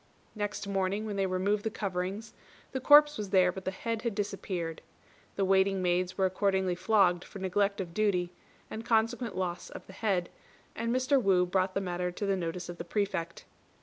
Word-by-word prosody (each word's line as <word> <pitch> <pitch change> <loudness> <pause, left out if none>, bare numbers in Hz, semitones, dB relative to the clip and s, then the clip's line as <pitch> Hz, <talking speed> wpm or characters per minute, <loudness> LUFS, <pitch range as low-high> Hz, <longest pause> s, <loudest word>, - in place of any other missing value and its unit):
Next 205 -1 -4
morning, 195 +2 -1
when 210 -2 -4
they 195 -1 +1
removed 200 +3 0
the 220 - 0
coverings, 200 +1 -4 0.4
the 265 - -2
corpse 295 0 +6
was 205 -2 -4
there 185 -2 +4
but 190 +1 -9
the - - +1
head 225 +4 -3
had 235 -3 -2
disappeared. 190 -5 -3 0.5
The 195 - +1
waiting 190 0 +3
maids 180 0 0
were 190 - +3
accordingly 190 0 +1
flogged 180 -1 +3
for - - -11
neglect 200 +2 0
of 175 -3 -5
duty, 180 -4 +1 0.3
and 220 - -6
consequent 230 -1 0
loss 180 -2 -3
of - - -10
the 190 - -13
head, 190 -5 0 0.5
and 230 +1 -2
Mr. 255 +2 +2
Wu 190 -4 +3
brought 185 +1 0
the 195 - +1
matter 180 -1 -2
to 205 - -3
the 195 -1 +1
notice 175 0 -4
of 175 -1 -8
the - - -3
Prefect. 170 -3 -3
195 Hz, 190 wpm, -30 LUFS, 180-210 Hz, 0.5 s, corpse